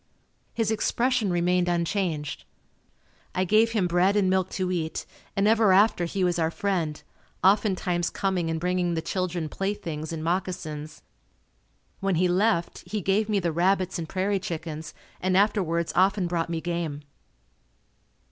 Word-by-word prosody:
His 225 -2 +1
expression 235 0 +1
remained 175 0 +2
unchanged. 170 - -1 0.9
I 185 - +2
gave 220 +4 +3
him 210 -5 +2
bread 180 +3 +3
and 195 -3 +3
milk 185 -1 +1
to 185 -1 -1
eat 160 -3 -2 0.3
and 195 +1 +2
ever 220 -2 +4
after 195 -2 +4
he 185 +3 -2
was 175 -1 +1
our 160 -1 +2
friend, 170 -5 -1 0.4
oftentimes 185 -3 +2
coming 185 -4 -1
and 160 0 -1
bringing 180 0 0
the 160 - -2
children 180 -3 -2
playthings 165 -4 -4
and 160 -1 -4
moccasins. 165 -4 -3 1.0
When 195 -2 0
he 180 +3 +3
left, 180 -1 +1
he 215 - -1
gave 200 +3 +1
me 205 -2 +2
the 170 -3 -1
rabbits 185 +2 +1
and 160 -2 -5
prairie 195 +1 0
chickens 160 -3 -6 0.3
and 185 0 +2
afterwards 180 -5 +1
often 190 +1 +3
brought 170 -1 -1
me 165 -1 -2
game. 170 -4 -3
180 Hz, 145 wpm, -26 LUFS, 170-195 Hz, 1.0 s, ever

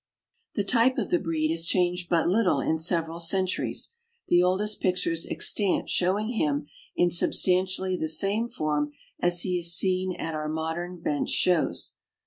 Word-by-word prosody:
The 205 - 0
type 240 +4 +2
of 235 - -2
the 175 - +3
breed 160 -3 -1
has 165 0 0
changed 180 -1 0
but 170 -2 +2
little 195 +1 +2
in 160 - 0
several 165 0 +1
centuries, 185 +2 0 0.4
the 175 - +5
oldest 195 +4 0
pictures 180 -3 0
extant 200 -4 +1
showing 195 +5 0
him 150 -12 -1 0.3
in 175 0 +2
sub 175 - +2
stantially 185 0 +1
the 160 - -2
same 200 +8 0
form 150 -7 -2 0.3
as 175 0 +3
he 180 -1 -1
is 170 0 +3
seen 185 -1 0
at 160 - -5
our 155 0 -3
modern 165 +3 -4
bench 145 -3 -2
shows. 180 -3 +1
175 Hz, 160 wpm, -26 LUFS, 165-190 Hz, 0.4 s, the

